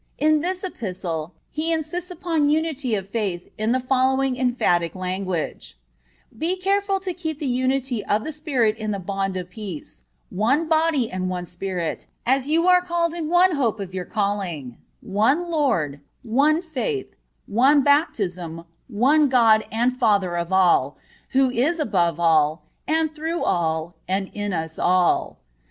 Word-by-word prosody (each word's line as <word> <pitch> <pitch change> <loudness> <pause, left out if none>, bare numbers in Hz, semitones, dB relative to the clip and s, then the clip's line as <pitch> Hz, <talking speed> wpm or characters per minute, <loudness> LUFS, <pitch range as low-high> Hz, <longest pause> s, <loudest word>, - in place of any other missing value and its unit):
In 310 0 +3
this 365 +4 -2
Epistle 180 - -4 0.2
he 320 +2 -1
insists 330 +3 -2
upon 330 -4 0
unity 300 -6 0
of 195 -2 -4
faith 200 -6 -3
in 215 +1 -1
the 255 - +2
following 260 +1 +1
emphatic 240 -10 +1
language: 185 - -4 0.6
"Be 345 +4 -1
careful 390 +1 +1
to 370 -1 -3
keep 320 -4 -4
the 300 - -5
unity 255 -2 0
of 210 +1 +1
the 315 - -4
Spirit 275 -8 0
in 215 -1 -4
the 205 - -1
bond 195 0 -3
of 180 0 -6
peace; 180 - -7 0.3
one 265 - +1
body 315 -6 +2
and 185 0 -2
one 180 -1 -3
Spirit, 175 -1 -4 0.2
as 265 +2 +2
you 330 +3 +2
are 360 0 +6
called 340 -2 -1
in 330 -3 -4
one 355 +2 +5
hope 235 -7 0
of 190 -2 -6
your 185 -1 -4
calling; 185 - -3 0.2
one 265 - +1
Lord, 200 - 0 0.2
one 290 +8 +2
faith, 375 - -3 0.3
one 265 +7 +4
baptism, 185 - 0 0.2
one 275 +6 +3
God 225 -4 +5
and 240 +3 +1
Father 205 -8 +2
of 170 +1 -3
all, 175 -7 +3 0.4
who 265 -1 +4
is 285 +8 +1
above 175 - +1
all, 160 -1 +3 0.2
and 315 0 +1
through 320 +2 -3
all, 160 0 0
and 190 +1 -1
in 205 -1 -3
us 160 -2 -3
all." 180 -1 +2
240 Hz, 155 wpm, -23 LUFS, 185-310 Hz, 0.6 s, are